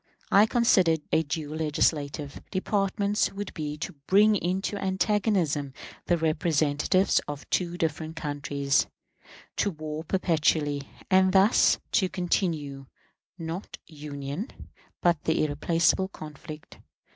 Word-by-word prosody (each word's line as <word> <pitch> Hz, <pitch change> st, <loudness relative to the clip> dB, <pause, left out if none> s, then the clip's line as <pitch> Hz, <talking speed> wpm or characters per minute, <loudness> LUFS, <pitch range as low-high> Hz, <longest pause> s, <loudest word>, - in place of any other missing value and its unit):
I 205 Hz, +2 st, +6 dB
consider 195 Hz, -9 st, +4 dB, 0.2 s
a -, -, +4 dB
dual 155 Hz, 0 st, -4 dB
legislative 150 Hz, -2 st, -1 dB
department 200 Hz, +1 st, 0 dB
would 205 Hz, 0 st, -5 dB
be 150 Hz, -1 st, -4 dB
to 180 Hz, +5 st, -5 dB
bring 210 Hz, +2 st, +5 dB
into 190 Hz, +2 st, -1 dB
antagonism 190 Hz, -, 0 dB, 0.3 s
the 175 Hz, -, +3 dB
representatives 155 Hz, +2 st, +2 dB
of 145 Hz, -1 st, -6 dB
two 175 Hz, -1 st, 0 dB
different 160 Hz, -1 st, -2 dB
countries, 145 Hz, -2 st, 0 dB, 0.7 s
to 205 Hz, -, +2 dB
war 155 Hz, -2 st, -6 dB
perpetually, 155 Hz, -5 st, +1 dB, 0.3 s
and 190 Hz, 0 st, +5 dB
thus 195 Hz, +4 st, +5 dB
to 190 Hz, -5 st, +2 dB
continue, 155 Hz, -7 st, -2 dB, 0.5 s
not 165 Hz, +3 st, -6 dB
union, 145 Hz, -, -6 dB, 0.5 s
but 170 Hz, -3 st, +2 dB
the 160 Hz, -, +2 dB
irrepressible 165 Hz, +5 st, +1 dB
conflict. 155 Hz, -3 st, -10 dB
160 Hz, 110 wpm, -27 LUFS, 150-190 Hz, 0.7 s, I